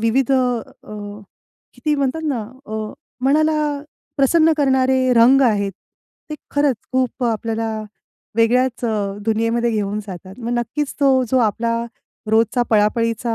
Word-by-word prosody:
विविध 235 +4 +1
अ, 215 -5 -3 0.5
किती 300 -2 -1
म्हणतात 280 +2 -1
ना 275 -6 -1 0.3
अ, 215 0 -4 0.3
मनाला 300 0 +2 0.4
प्रसन्न 315 +4 +4
करणारे 260 -2 +2
रंग 245 +4 +6
आहेत. 205 -5 +1 0.6
ते 305 - -2 0.2
खरंच 285 -3 +2 0.2
खूप 255 -1 0
आपल्याला 225 0 -1 0.7
वेगळ्याच 245 +1 +2
अ, 205 -3 -1
दुनियेमध्ये 230 +2 +1
घेऊन 210 -1 -1
जातात. 190 0 -9
मग 235 -1 -4
नक्कीच 270 +5 -3
तो 265 -2 +4
जो 260 - +3
आपला 230 +1 0 0.5
रोजचा 225 +2 +3
पळापळीचा 230 +2 +1
235 Hz, 120 wpm, -20 LUFS, 220-265 Hz, 0.7 s, रंग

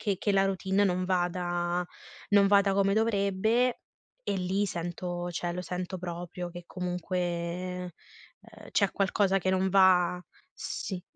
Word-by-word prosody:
che 200 -3 0
che 205 - 0
la 195 0 +4
routine 190 +1 +1
non 185 -1 +1
vada 175 -1 0 0.5
non 200 -1 +6
vada 200 -1 +4
come 195 0 +3
dovrebbe. 220 +3 +1 0.4
E - - -1
lì 190 +2 0
sento 175 0 -4
cioè, 175 0 -3
lo 180 - -4
sento 180 +1 -4
proprio 175 0 -5
che 175 0 -9
comunque, 180 0 -3
ehm, 180 +1 -3 0.8
c'è 200 -3 +3
qualcosa 195 0 +2
che 185 - 0
non 190 0 +2
va. 185 -2 +5 0.4
Sì, 185 -3 -5
185 Hz, 140 wpm, -29 LUFS, 175-195 Hz, 0.8 s, non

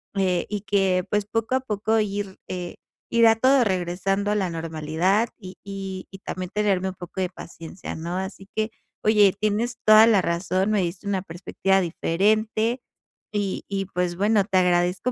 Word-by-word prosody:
eh, 185 -3 +1
y 205 -2 -3
que, 190 -2 +1
pues, 210 -1 0
poco 225 +4 -1
a 260 - +3
poco 220 -1 0
ir, 200 -2 -3
eh, 180 -1 -5 0.3
irá 230 -1 +5
todo 260 +3 +4
regresando 195 +1 -1
a 210 - +1
la 190 -4 0
normalidad 165 +6 0
y 185 -3 -10
y 195 -1 -6
y 195 - -10
también 185 -2 -6
tenerme 195 -3 +1
un 190 - -8
poco 175 +1 -8
de 185 -1 0
paciencia, 165 0 -9
¿no? 170 +2 -4
Así 190 +1 -6
que, 220 0 0 0.3
oye, 210 -3 +5
tienes 215 +3 -1
toda 215 +1 +8
la 215 -4 +5
razón, 185 +3 0
me 210 -2 +2
diste 180 +3 -4
una 195 -2 -1
perspectiva 190 +2 0
diferente 215 +7 0 0.5
y 205 -2 -2
y, 195 -1 -2
pues, 180 -2 -2
bueno 205 0 +3
te 190 -2 +1
agradezco 180 +5 +1
195 Hz, 170 wpm, -24 LUFS, 180-210 Hz, 0.5 s, toda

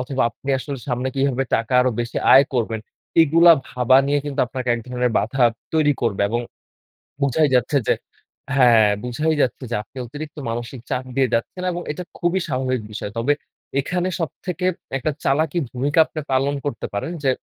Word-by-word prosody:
অথবা 130 +1 -1
আপনি 140 - -13
আসলে 140 +1 -5
সামনে 125 +1 -1
কিভাবে 135 -1 +1
টাকা 115 +2 -1
আরও 130 0 +2
বেশি 120 -1 -4 0.2
আয় 135 - +8
করবেন, 115 -2 -1 0.4
এগুলা 165 +2 +7 0.2
ভাবা 125 +1 +3
নিয়ে 145 +1 +2
কিন্তু 145 -1 -2
আপনাকে 130 0 -5
এক 120 - -4
ধরনের 125 -1 0
বাধা 120 +6 0 0.3
তৈরি 150 -2 +4
করবে। 115 -5 0
এবং 120 +3 0 0.8
বুঝাই 140 +2 +3
যাচ্ছে 125 +4 +2
যে - - +5 0.6
হ্যাঁ, 120 -5 +6 0.2
বুঝাই 150 +6 0
যাচ্ছে 130 +1 -1
যে 120 - 0
আপনি 110 - -28
অতিরিক্ত 150 +5 -8
মানসিক 120 +2 -5
চাপ 125 - -1
দিয়ে 135 -1 +3
যাচ্ছেন 115 +10 -2
এবং 175 0 -4
এটা 180 +4 -6
খুবই 175 +2 +1
স্বাভাবিক 130 -2 -1
বিষয়। 105 -1 -5
তবে 125 +6 +2 0.5
এখানে 180 +5 -1
সব 165 -4 -1 0.2
থেকে 180 0 -3 0.3
একটা 155 - -1
চালাকি 155 +4 +1
ভূমিকা 140 +6 -1
আপনি 155 - -6
পালন 135 +2 +2
করতে 130 -7 -3
পারেন 100 +12 -3
যে 135 - +4
130 Hz, 175 wpm, -21 LUFS, 120-150 Hz, 0.8 s, আয়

